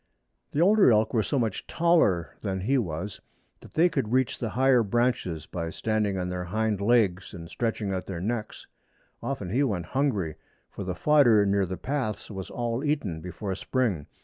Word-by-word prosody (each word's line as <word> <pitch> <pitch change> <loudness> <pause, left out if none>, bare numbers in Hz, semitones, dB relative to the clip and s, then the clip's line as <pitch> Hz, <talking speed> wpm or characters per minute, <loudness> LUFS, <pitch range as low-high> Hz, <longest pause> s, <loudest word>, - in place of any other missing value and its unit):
The 150 - 0
older 200 - +6
elk 110 0 +2
were 115 - +3
so 140 - -1
much 115 -6 -2
taller 160 - +2
than 95 -3 -2
he 130 +9 +1
was 90 -1 -4 0.4
that - - -16
they 165 +3 +5
could 135 -10 -2
reach 130 0 +1
the 115 - -2
higher 130 +1 +4
branches 110 - 0
by 85 +1 -4
standing 105 +1 -1
on 90 -1 -2
their 90 0 -3
hind 105 +2 -1
legs 100 -5 +2
and 85 -2 -8
stretching 105 +1 -2
out 95 - -4
their 95 -3 -4
necks. 110 +3 -4 0.6
Often 105 -10 -4
he 125 +6 +2
went 100 -11 0
hungry, 105 - -1 0.3
for - - -6
the 90 -1 -3
fodder 120 -8 +5
near 100 -1 +2
the 95 +1 -4
paths 130 -8 -3
was 95 -2 -6
all 120 +2 -2
eaten 120 - -1
before 95 +3 -5
spring. 100 - -1
110 Hz, 180 wpm, -27 LUFS, 95-125 Hz, 0.6 s, older